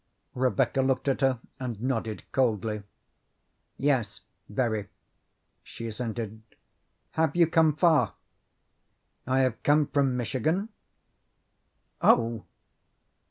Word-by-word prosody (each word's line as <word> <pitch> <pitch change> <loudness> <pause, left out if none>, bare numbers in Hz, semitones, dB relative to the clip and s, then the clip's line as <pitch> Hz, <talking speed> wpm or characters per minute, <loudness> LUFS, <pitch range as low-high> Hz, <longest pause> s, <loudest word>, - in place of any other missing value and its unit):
Rebecca 130 0 +1
looked 130 +1 0
at 135 0 +1
her 135 -2 +3 0.2
and 120 -5 -4
nodded 115 -3 -2
coldly. 110 -4 0 1.0
"Yes, 125 -7 0 0.3
very," 110 -2 -1 0.7
she 115 - -9
assented. 110 -1 -4 0.7
"Have 160 -1 +1
you 175 -1 +6
come 160 -2 +3
far?" 160 -1 +3 1.1
"I 130 +1 +3
have 130 -3 0
come 150 +1 +4
from 135 -3 +1
Michigan." 145 - -1 1.3
"Oh!" 115 -2 +3
130 Hz, 95 wpm, -28 LUFS, 115-140 Hz, 1.3 s, you